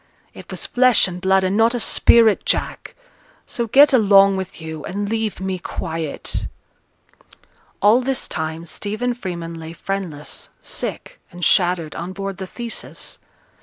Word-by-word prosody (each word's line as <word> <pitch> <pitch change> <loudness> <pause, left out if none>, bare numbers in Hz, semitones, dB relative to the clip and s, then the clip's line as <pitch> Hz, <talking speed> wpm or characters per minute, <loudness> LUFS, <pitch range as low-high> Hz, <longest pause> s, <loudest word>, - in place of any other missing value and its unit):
It - - -13
was - - -4
flesh 250 -4 +4
and 180 -1 -7
blood, 190 0 +3
and 185 +1 0
not 225 +3 +3
a - - -1
spirit, 225 -1 +4
Jack. - - -2 0.5
So 235 -1 -3
get 280 +5 +6
along 200 -4 +6
with 190 -2 -5
you, 160 -2 -7
and 205 +2 -3
leave 220 -1 -2
me 190 -1 -3
quiet.' 160 -3 -4 1.4
All 215 +5 +6
this 265 +1 -1
time 160 0 -4
Stephen 215 +9 -3
Freeman 175 -7 -6
lay 165 0 -8
friendless, 170 -5 -5
sick, - - -5
and 175 -1 -4
shattered, 175 -4 +2
on 175 +2 -5
board 195 0 -5
the 190 -1 -6
Theseus. 235 +3 -5
190 Hz, 145 wpm, -20 LUFS, 170-225 Hz, 1.4 s, get